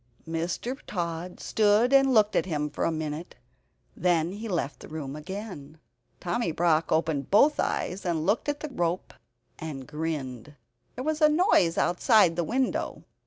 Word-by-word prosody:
Mr. 170 +11 -3
Tod 175 -1 -4
stood 215 +4 +3
and 270 -1 +6
looked 215 -3 +4
at - - +1
him 150 -3 -2
for - - -2
a - - +1
minute; 155 +1 -5 0.6
then 170 -2 +1
he 215 +3 -6
left 170 -6 -2
the - - -11
room 150 -3 -6
again. 160 -3 -7 0.4
Tommy 175 +1 -1
Brock 165 -1 +1
opened 160 -3 0
both 280 +9 +5
eyes, 185 +3 -1
and 165 -3 -1
looked 210 - +1
at 290 0 -2
the 305 - -4
rope 175 -7 -2 0.5
and 145 -5 -6
grinned. 150 -4 -5 0.4
There 255 - -5
was 310 +2 -1
a 305 - +7
noise 300 - +3
outside 180 -1 +4
the 175 - 0
window. 255 +8 -1
175 Hz, 160 wpm, -27 LUFS, 155-220 Hz, 0.6 s, a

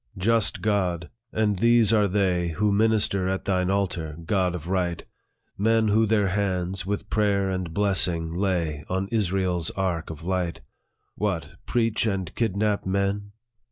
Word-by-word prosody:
" - - -16
Just 115 -2 +2
God! 90 -6 0 0.2
and 105 -3 0
these 115 -1 +4
are 105 -2 +4
they, 90 -3 +1
Who 105 +5 +1
minister 100 -3 +2
at 95 0 -2
thine 90 -1 +1
altar, 90 -6 -1
God 90 -2 +1
of 85 -1 -7
right! 90 -2 -1 0.5
Men 110 +1 +3
who 110 +2 +3
their 105 -2 +2
hands, 95 -2 -1
with 100 0 -3
prayer 100 -2 +1
and 95 -3 -3
blessing, 90 -4 +1
lay 85 -5 -1
On 95 +1 -1
Israel's 95 -6 0
ark 90 -4 -2
of 80 0 -8
light 90 -1 -2 0.3
" - - -49
What! 85 -8 -2
preach, 115 -1 +1
and 95 -5 -2
kidnap 105 -2 0
men 100 +1 -1
95 Hz, 155 wpm, -25 LUFS, 90-105 Hz, 0.5 s, these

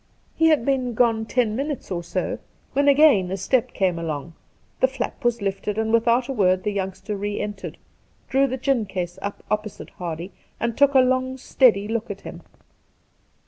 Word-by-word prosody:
He 325 - +4
had 305 -7 +3
been 255 -4 0
gone 225 -2 +2
ten 230 -4 +1
minutes 275 -3 -4
or 175 -2 -1
so, 180 +2 -3 0.3
when 280 +1 +2
again 280 -10 +5
a 190 - -2
step 240 +5 +1
came 180 -3 0
along; 160 -1 -4 0.5
the 260 - +5
flap 265 +1 -5
was 235 -3 +1
lifted, 200 +1 -2
and 220 0 0
without 235 +2 +3
a 270 - -3
word 185 -5 +2
the 210 - 0
youngster 195 +2 -4
re 205 +1 -3
entered, 205 -2 -5 0.5
drew 275 +1 +3
the 260 0 -3
gin 255 -4 0
case 180 -1 -4
up 200 +1 -5
opposite 215 -1 -3
Hardy, 170 +1 -6 0.3
and 235 -1 -1
took 280 0 +4
a 260 - +8
long 255 0 +1
steady 225 -6 +3
look 225 +1 -2
at 200 -1 -6
him. - - -9
220 Hz, 185 wpm, -23 LUFS, 195-260 Hz, 0.5 s, a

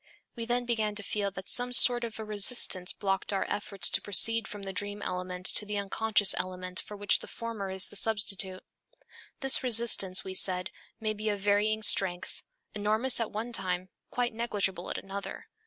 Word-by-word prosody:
We 230 -2 -5
then 245 +1 -2
began 220 -3 -1
to 205 - -4
feel 200 0 -3
that 190 0 -10
some 245 0 +3
sort 245 -1 +5
of 230 -1 -7
a 220 - -7
resistance 205 -3 +2
blocked 195 -1 -3
our 195 - -2
efforts 205 -1 -2
to 185 - 0
proceed 225 +3 +3
from 205 -1 -9
the 195 0 -5
dream 205 +2 -4
element 180 0 -6
to - - +1
the 210 0 -5
unconscious 205 0 +2
element 185 0 -6
for 210 - -10
which 205 0 +1
the - - -11
former 225 -4 -7
is 190 0 +5
the - - -12
substitute. 195 -3 +2 0.8
This 270 +2 +6
resistance, 230 -6 +2
we 190 - -7
said, 180 -1 +4 0.3
may 215 -1 -2
be 215 +1 -4
of 205 -1 -3
varying 210 +2 0
strength, 190 -3 0 0.3
enormous 215 +5 +2
at 230 - -3
one 230 +3 -6
time, 185 -2 -3 0.2
quite 245 -1 -3
negligible 205 -5 -3
at - - -4
another. 195 +1 -8
205 Hz, 185 wpm, -28 LUFS, 190-225 Hz, 0.8 s, This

